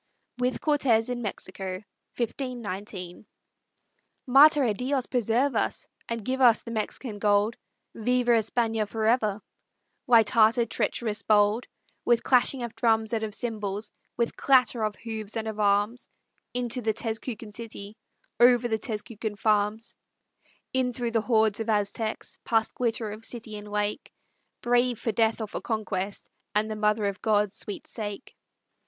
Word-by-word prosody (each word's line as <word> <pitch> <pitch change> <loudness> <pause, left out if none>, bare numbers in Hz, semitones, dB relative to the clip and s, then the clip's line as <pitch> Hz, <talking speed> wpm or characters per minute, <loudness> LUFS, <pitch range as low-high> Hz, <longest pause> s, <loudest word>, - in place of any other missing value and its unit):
WITH 250 +1 0
CORTEZ 250 -6 +2
IN 245 -1 -3
MEXICO 190 -2 -5 2.4
"Mater 290 +3 +7
á 220 -5 +1
Dios, 260 +2 -1
preserve 245 +3 +1
us - - -1 0.2
And 230 -3 -3
give 260 +1 -1
us 235 -3 +6
the 230 - -7
Mexican 220 0 -3
gold, 205 +2 +2 0.4
Viva 245 +2 +1
España 225 -1 +1
forever!" 220 -1 +1 0.6
Light 230 -4 +6
hearted, 230 0 +4
treacherous, 215 -3 -1
bold, 210 +2 +3 0.4
With 240 -1 +3
clashing 255 0 +3
of 235 -1 -5
drums 225 -1 +1
and 225 - 0
of 215 -1 -3
cymbals, 210 -3 -4 0.3
With 235 -1 0
clatter 255 -3 +3
of 215 -1 -1
hoofs 220 0 -5
and 220 0 -3
of 215 -1 -5
arms, 205 +3 +1 0.4
Into 245 0 -1
the 220 -1 0
Tezcucan 225 0 -4
city, 215 -2 -6 0.4
Over 245 0 +6
the 220 -2 -1
Tezcucan 220 -1 -4
farms; 215 +1 +1 0.8
In 255 -1 +1
through 235 -1 -3
the 225 -1 +2
hordes 220 -2 +2
of 225 0 -3
Aztecs, 215 +1 -2
Past 225 -1 +1
glitter 225 -3 -1
of 215 +2 -9
city 225 -2 -5
and 210 0 -8
lake, 210 0 -2 0.5
Brave 245 0 +2
for 225 - -2
death 225 +1 +1
or 220 - -3
for - - -5
conquest, 200 -3 -3 0.3
And 215 +1 +1
the - - -3
Mother 210 0 +1
of 200 0 -3
God's 210 -2 +2
sweet 205 - -5
sake. 210 +1 -7
225 Hz, 145 wpm, -27 LUFS, 210-240 Hz, 2.4 s, Mater